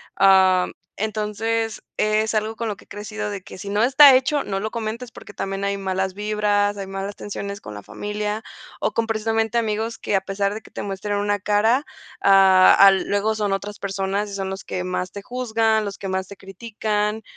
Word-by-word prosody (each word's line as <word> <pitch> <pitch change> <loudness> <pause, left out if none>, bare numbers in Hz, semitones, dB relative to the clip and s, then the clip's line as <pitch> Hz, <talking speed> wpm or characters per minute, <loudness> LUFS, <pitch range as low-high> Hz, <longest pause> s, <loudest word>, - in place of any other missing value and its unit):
am, 190 -1 +5 0.3
entonces 220 +1 -2
es 215 +1 +1
algo 215 +1 -1
con 230 - -3
lo 210 - -2
que - - -16
he - - -45
crecido, 210 0 -5
de 200 -2 -5
que - - -12
si 200 +2 -7
no 205 +1 +1
está 270 +2 +8
hecho 265 +3 +1
no 195 -1 -3
lo 215 +2 -3
comentes 230 +1 -5
porque 205 - -12
también 195 0 -4
hay 200 0 -1
malas 190 -1 -2
vibras, 205 0 0
hay 195 -1 -5
malas 195 +1 -5
tensiones 200 0 -6
con 105 - -9
la 105 0 -9
familia 210 - -4 0.4
o - - 0
con 230 0 0
precisamente 225 +1 0
amigos 225 0 -1
que, - - -4
a - - +4
pesar 195 +1 -1
de 215 - -5
que - - -18
te - - -6
muestren 205 +1 -3
una 205 0 0
cara, 220 +7 +2 0.4
ah, 190 -1 +7
al 195 -1 +7
luego 205 +2 +1
son 205 -2 0
otras 205 +1 -5
personas 195 +1 -2
y - - -8
son 195 -1 -3
los 190 0 -6
que 180 - -3
más 180 0 -3
te 200 - -6
juzgan, 225 -2 0
los 200 -1 -5
que 195 - -6
más 190 0 -2
te 200 - -10
critican, 210 +2 -3
205 Hz, 205 wpm, -22 LUFS, 195-220 Hz, 0.4 s, está